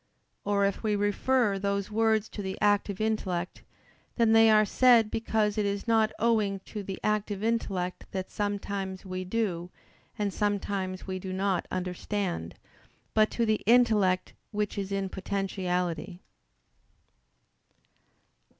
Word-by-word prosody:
Or, 200 -1 +2
if 200 - -1
we 215 -2 +1
refer 205 +1 +1
those 200 0 -1
words 220 0 +2
to 205 - -6
the 190 -1 -4
active 205 -1 +2
intellect, 190 -5 -2 0.5
then 230 -2 +3
they 225 0 +7
are 215 0 +6
said 235 0 +5
because 220 -1 0
it 210 - +1
is 200 +3 -3
not 220 -1 +3
owing 215 -3 +1
to 210 +2 -7
the 195 -1 -6
active 210 -1 -1
intellect 195 -6 -1
that 190 -1 -5
sometimes 200 -2 -3
we 185 0 -4
do, 185 -3 -2 0.5
and 205 -3 -1
sometimes 200 -2 -2
we 185 -1 -4
do 185 0 -6
not 190 -1 0
understand, 180 - -3 0.6
but 215 -1 +4
to 235 - 0
the 215 -1 +1
intellect 215 -6 +4 0.2
which 210 -1 -2
is 200 -1 -4
in 195 -1 -1
potentiality. 185 -2 -2
200 Hz, 130 wpm, -28 LUFS, 190-215 Hz, 0.6 s, they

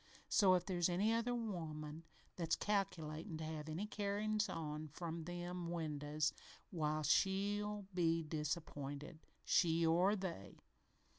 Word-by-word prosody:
So, 190 -3 +6
if 180 -1 0
there's 175 -2 +2
any 200 +6 +3
other 230 +2 +1
woman 160 -8 -4 0.3
that's 165 -2 +1
calculatin' 165 -4 -1
to 160 - -5
have 155 -1 -4
any 165 +7 -2
carryin's 210 +1 0
on 155 -3 -3
from 165 +2 -5
them 175 0 -4
windows 150 -2 -1 0.4
why, 155 -3 0
she'll 205 +5 +2
be 165 -2 +2
disappointed 150 -1 -3 0.3
she 165 -1 +4
or 180 +5 +4
they. 185 - -5
170 Hz, 125 wpm, -39 LUFS, 155-195 Hz, 0.4 s, So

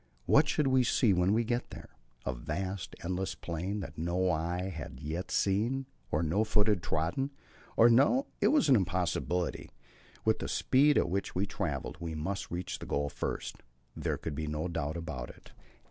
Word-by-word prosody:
What 150 +1 +5
should 150 - +2
we 130 -1 +4
see 120 -3 +3
when 90 +1 +3
we 115 +3 +3
got 120 +2 -1
there? - - -10 0.4
A 60 - 0
vast, 90 +9 -4
endless 95 +2 -2
plain, 90 +5 -3
that 95 - -8
no 90 +2 +1
eye 90 +3 -1
had 65 -4 -7
yet 80 +6 -4
seen 115 +8 +1 0.3
and 80 +2 +1
no 100 +8 +2
foot 110 -1 +2
yet 105 -5 +2
trodden; 85 - -1 0.5
or 115 - +8
No, 140 - +5 0.2
it - - +5
was 300 - +4
an 135 - +7
impossibility; 90 -2 0 0.6
with - - +3
the - - -3
speed 145 +3 +4
at - - +3
which 100 +1 -2
we 95 - +1
had 100 - -4
travelled, 75 - -3
we 85 -2 -4
must 95 +6 -3
reach 90 +1 -4
the - - -8
goal 70 0 0
first, - - -4 0.4
there - - -1
could 80 - -5
be 75 +2 -3
no 75 +3 -2
doubt 80 -2 -2
about 75 -8 -5
that. - - -14
90 Hz, 190 wpm, -31 LUFS, 80-110 Hz, 0.6 s, or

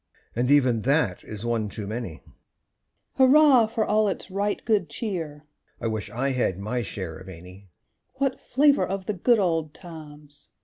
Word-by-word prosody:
(And 125 +2 0
even 130 -6 +4
that 135 - +1
is 105 +1 -8
once 115 -3 -2
too 105 - -5
many;) 110 -5 -6 0.9
Hurrah 265 -3 +6
for 220 0 -1
all 215 0 +2
its 195 -1 -4
right 200 +2 -1
good 210 -8 +1
cheer! 160 -7 -5 0.3
(I - - -6
wish 110 -2 -2
I 135 +4 -1
had 125 -8 0
my 110 +5 -2
share 95 -6 -6
of 95 0 -12
any!) 90 +2 -12 0.5
What 270 -1 -1
flavour 280 +2 +3
of 195 0 -4
the 210 - -1
good 230 +6 +3
old 165 -6 0
times! 150 -4 -12
145 Hz, 165 wpm, -25 LUFS, -, 0.9 s, Hurrah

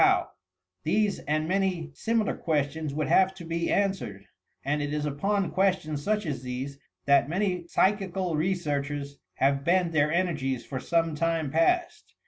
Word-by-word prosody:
howt - - +4 0.5
These, 210 - +1
and 155 +1 0
many 185 -4 0
similar 225 +5 0
questions, 150 -1 -1
would 150 +2 -1
have 190 0 +4
to 175 -3 -9
be 170 +1 -1
answered, 190 - -1 0.4
and 145 +2 0
it 145 0 -2
is 150 0 -1
upon 195 +7 0
questions 185 -6 +1
such 210 +1 0
as 140 -5 -3
these 130 +2 -5 0.3
that 140 0 +4
many 180 -1 -1
psychical 190 -3 +1
researchers 145 -4 -2 0.2
have 140 +1 +2
bent 175 +1 +2
their 150 -1 +2
energies 150 -8 0
for 130 - -4
some 165 +1 +1
time 160 -2 0
past. 345 - +1
165 Hz, 150 wpm, -27 LUFS, 145-190 Hz, 0.5 s, howt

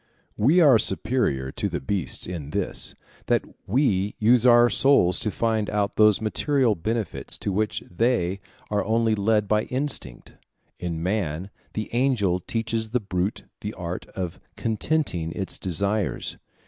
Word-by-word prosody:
We 150 +12 +4
are 135 -8 +7
superior 95 - +1
to - - -2
the - - -3
beasts 85 +2 -2
in 85 -6 -6
this, 100 +3 -3 0.3
that - - +2 0.2
we 105 -4 +1
use 120 +2 +4
our 120 0 +7
souls 110 -7 +4
to 105 - +1
find 110 -1 0
out 105 -1 -1
those 105 -1 +5
material 130 +2 +2
benefits 110 +4 -3
to 100 - -3
which 105 +2 -1
they 100 -1 0 0.3
are 105 -1 +1
only 115 0 +2
led 105 0 +1
by 105 +1 +2
instinct. 130 - -3 0.5
In 85 -2 -3
man, 95 -2 -2 0.2
the 110 - -3
angel 120 -8 +2
teaches 115 +3 -2
the 125 +3 +1
brute 95 -1 -2 0.2
the 105 +1 -5
art 90 0 -5
of 90 -3 -4 0.2
contenting 110 - -1
its 95 -2 -4
desires. 100 +3 -1
105 Hz, 145 wpm, -25 LUFS, 90-115 Hz, 0.5 s, are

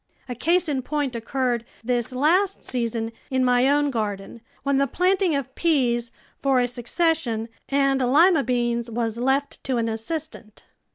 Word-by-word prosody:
A 250 - -4
case 340 +8 +1
in 280 -3 -1
point 285 -1 -2
occurred 240 0 -1 0.2
this 245 +1 -1
last 345 +10 +2
season 230 -2 -2 0.2
in 260 -1 +1
my 250 +1 +4
own 290 0 +2
garden, 210 -1 -4 0.2
when 275 -1 +1
the 275 - +2
planting 365 +2 +2
of 270 -1 -3
peas, 245 -8 +1 0.3
for 270 -2 +3
a 245 - +2
succession, 245 -1 -1 0.2
and 275 -1 +2
lima 300 +5 +5
beans 240 -1 -1
was 230 -1 -2
left 265 +3 -1
to 260 -2 0
an 230 -1 0
assistant. 225 0 -5
255 Hz, 155 wpm, -24 LUFS, 235-290 Hz, 0.3 s, lima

